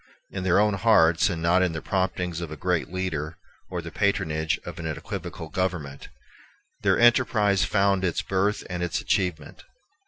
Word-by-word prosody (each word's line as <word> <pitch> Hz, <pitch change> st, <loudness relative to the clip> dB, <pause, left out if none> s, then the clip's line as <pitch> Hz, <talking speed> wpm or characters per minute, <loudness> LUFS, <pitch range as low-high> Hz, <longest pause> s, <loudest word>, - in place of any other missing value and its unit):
In 95 Hz, -, -4 dB
their 90 Hz, +1 st, +3 dB
own 105 Hz, 0 st, +3 dB
hearts, 95 Hz, -5 st, +4 dB
and 85 Hz, -3 st, -4 dB
not 90 Hz, +2 st, +4 dB
in 90 Hz, -3 st, +1 dB
the 80 Hz, -, -3 dB
promptings 90 Hz, -3 st, -1 dB
of 85 Hz, -, -5 dB
a 80 Hz, -, -7 dB
great 90 Hz, +1 st, -1 dB
leader 85 Hz, -4 st, -3 dB, 0.3 s
or 90 Hz, -2 st, -4 dB
the 85 Hz, -, -7 dB
patronage 80 Hz, -6 st, 0 dB
of 85 Hz, 0 st, -7 dB
an 80 Hz, -, -4 dB
equivocal 80 Hz, +1 st, -6 dB
government, 80 Hz, -6 st, -3 dB, 0.7 s
their -, -, +3 dB
enterprise 115 Hz, -5 st, +3 dB
found 100 Hz, -2 st, +2 dB
its 85 Hz, -3 st, 0 dB
birth 95 Hz, +2 st, 0 dB
and 90 Hz, -1 st, -4 dB
its 90 Hz, -1 st, -1 dB
achievement. 90 Hz, -6 st, -2 dB
90 Hz, 165 wpm, -25 LUFS, 80-95 Hz, 0.7 s, hearts